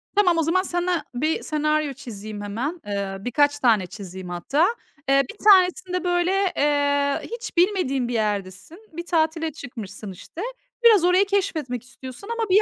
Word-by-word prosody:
Tamam, 365 -5 +4
o 330 - +2
zaman 335 +4 +2
sana 350 -2 -1
bir 305 +6 -1
senaryo 305 -1 0
çizeyim 215 -5 -8
hemen. 245 - -4
Eee, 200 -1 -3
birkaç 290 +7 +1
tane 220 -8 +3
çizeyim 185 -2 -8
hatta. 275 - +1 0.4
Eee, 275 0 +5
bir - - -18
tanesinde 365 -2 +4
böyle, 350 0 +1 0.3
eee, 285 -1 +2
hiç 470 -4 -7
bilmediğin 340 - +2
bir 245 - -3
yerdesin. 205 - -3 0.2
Bir 340 +2 -6
tatile 320 -1 0
çıkmışsın, 215 -7 -8
işte. 190 - -10 0.4
Biraz 440 -6 +7
orayı 360 +3 +4
keşfetmek 320 - -1
istiyorsun 255 - -10
ama 455 -2 -2
bir 390 +3 +6
295 Hz, 150 wpm, -23 LUFS, 230-355 Hz, 0.4 s, Biraz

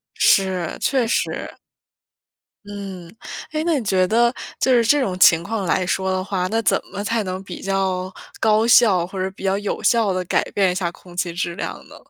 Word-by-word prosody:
是， 185 -3 +2
确 260 -4 +1
实。 230 - -2 1.1
嗯， 195 -4 -8 0.4
哎， 310 0 -1
那 330 -4 +1
你 235 - -5
觉 185 -2 +2
得 235 +4 +3 0.3
就 260 - +1
是 235 -1 +4
这 290 +6 +3
种 185 -8 -2
情 165 -2 +6
况 205 +1 -3
来 185 +1 0
说 190 +1 -1
的 185 0 -1
话， 185 -2 -2
那 225 +2 0
怎 - - +2
么 200 +1 -4
才 225 +1 -1
能 185 0 -5
比 185 -2 -9
较 190 -1 -1 0.3
高 220 +1 +3
效， 200 -7 +5
或 190 +1 -8
者 190 - -2
比 190 - -14
较 195 0 +1
有 205 -1 -4
效 225 -5 +3
地 185 0 -1
改 - - +1
变 195 -2 +2
一 - - -2
下 175 -2 -2
空 175 0 -16
气 175 -1 -1
质 170 0 -3
量 - - -4
呢？ - - -13
195 Hz, 220 characters per minute, -21 LUFS, 185-220 Hz, 1.1 s, 情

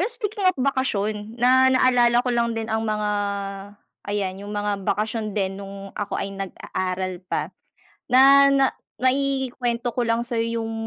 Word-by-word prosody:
Pero 385 - +1
speaking 425 -5 -3
of 370 - +1
bakasyon 220 -5 -1
na 260 +2 +5
naalala 245 -2 +4
ko 250 - 0
lang 235 -1 0
din 225 - -3
ang 220 0 0
mga 210 -1 -1 1.0
ayan, 195 -2 -2
'yong 205 +1 -7
mga 205 0 -1
bakasyon 215 0 -2
din 195 -1 -1
nung 195 0 -9
ako 205 -1 -3
ay 195 - -3
nag-aaral 185 -1 -4
pa. - - -2 0.6
Na, 275 +2 +7
na 275 -1 +4 0.4
maikwento 255 -3 0
ko 245 - +1
lang 230 0 +1
sa'yo 230 -1 -2
'yong 225 0 -4
230 Hz, 155 wpm, -23 LUFS, 205-260 Hz, 1.0 s, Na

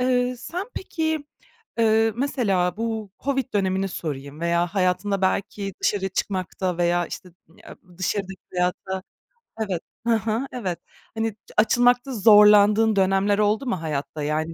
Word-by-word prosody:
Eee, 250 0 +1
sen 355 - -5
peki, 315 -4 -2 0.5
eee, 225 0 +3
mesela 205 - 0
bu 220 -3 -3
Covid 270 -4 -1
dönemini 190 -1 +1
sorayım 145 -4 -6
veya 170 +1 +1
hayatında 190 +1 0
belki 195 +1 -1
dışarı 195 -2 0
çıkmakta 185 -1 -2
veya 175 0 +2
işte 180 - -8
ı - - -25 0.3
em, 180 -1 -15
dışarıdaki 190 0 -3
hayata 180 +1 -2 0.6
evet 190 -6 -2 0.3
hı 235 - +4
hı, 225 +4 -1
evet. 190 -9 -4 0.4
Hani, 225 -2 -1 0.2
açılmakta 245 +4 +3
zorlandığın 210 0 +6
dönemler 195 +2 +2
oldu 210 +5 +2
mu 190 -9 -2
hayatta? 150 -1 -4
Yani, 155 +2 -1
200 Hz, 130 wpm, -24 LUFS, 180-225 Hz, 0.6 s, zorlandığın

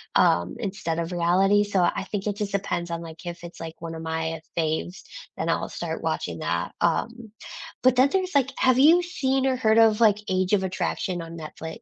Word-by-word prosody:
um, 85 +1 +3
instead 170 -4 -3
of 170 +1 -3
reality, 190 +4 +3
so, 205 -2 0
I 175 +2 +1
think 205 -1 -3
it 205 - -1
just 205 -1 -3
depends 190 -3 -2
on, 170 0 -3
like, 165 +1 -10
if 175 0 -6
it's, 175 0 -10
like, 165 0 -8
one 165 -1 -6
of 160 - -7
my 160 0 -3 0.2
faves, 165 +2 -2 0.3
then - - -2
I'll - - 0
start - - -5
watching 80 - -2
that, 85 +2 -2
um, 225 +7 -1 0.5
but 255 0 +5
then 260 +2 +5
there's, 375 -3 -1
like, 270 -1 +3
have 255 -1 +3
you 325 +6 +7
seen 270 -6 0
or 265 -1 +2
heard 220 -3 +3
of, 225 -1 +5
like, 210 -3 +5
Age 185 +1 0
of 195 - +3
Attraction 185 0 -2
on 165 0 -8
Netflix? 160 0 -8
185 Hz, 210 wpm, -25 LUFS, 165-225 Hz, 0.5 s, you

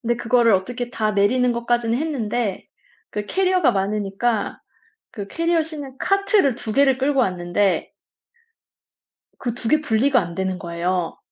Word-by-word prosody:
근데 240 0 0
그거를 235 -2 +3
어떻게 240 +6 -1
다 215 -3 -1
내리는 245 +6 +2
것까지는 235 0 0
했는데 240 -9 -2 0.4
그 210 0 -4
캐리어가 370 -8 +2
많으니까 205 +3 -1 0.5
그 200 -2 -7
캐리어 335 +6 +1
싣는 290 -4 -7
카트를 395 - +2
2 220 -2 -5
개를 270 0 +3
끌고 275 0 +2
왔는데 185 -1 0 1.5
그 240 -3 -2
2 235 - -5
개 305 0 +3
분리가 250 0 +2
안 170 -2 -5
되는 190 -1 -2
거예요. 175 -1 -2
235 Hz, 290 characters per minute, -22 LUFS, 200-270 Hz, 1.5 s, 그거를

